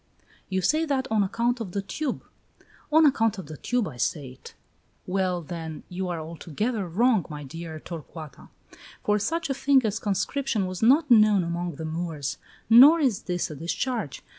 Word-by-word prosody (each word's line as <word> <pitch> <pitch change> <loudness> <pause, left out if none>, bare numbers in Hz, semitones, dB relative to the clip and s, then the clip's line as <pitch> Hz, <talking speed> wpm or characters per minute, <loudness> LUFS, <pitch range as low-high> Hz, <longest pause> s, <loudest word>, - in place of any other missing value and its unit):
"You 190 -1 -1
say 310 - +2
that 270 -3 -1
on 220 -1 +3
account 235 +5 0
of 195 -6 -6
the 200 - -1
tube." 285 +6 -4 0.7
"On 315 +1 +6
account 225 -7 +2
of 190 - -7
the 155 +1 -9
tube 245 - -1
I 130 - -9
say 140 +1 -2
it." 125 - -14 0.5
"Well, 185 -2 -1
then, 160 -1 -7
you 180 0 -4
are 170 -2 -3
altogether 175 - -3
wrong, 215 +3 +2
my 150 -1 -7
dear 160 +2 -7
Torcuata, 160 -2 -10 0.5
for 210 0 +2
such 325 +7 -1
a - - +2
thing 270 -2 +3
as 215 0 -1
conscription 210 +2 -1
was 185 -1 -5
not 275 +5 +4
known 215 -4 +6
among 170 -1 -3
the 160 - -6
Moors, 160 -3 -4 0.3
nor 270 +9 +8
is 255 - +1
this 175 -2 -1
a - - -7
discharge. 175 - -3
195 Hz, 175 wpm, -26 LUFS, 165-245 Hz, 0.7 s, nor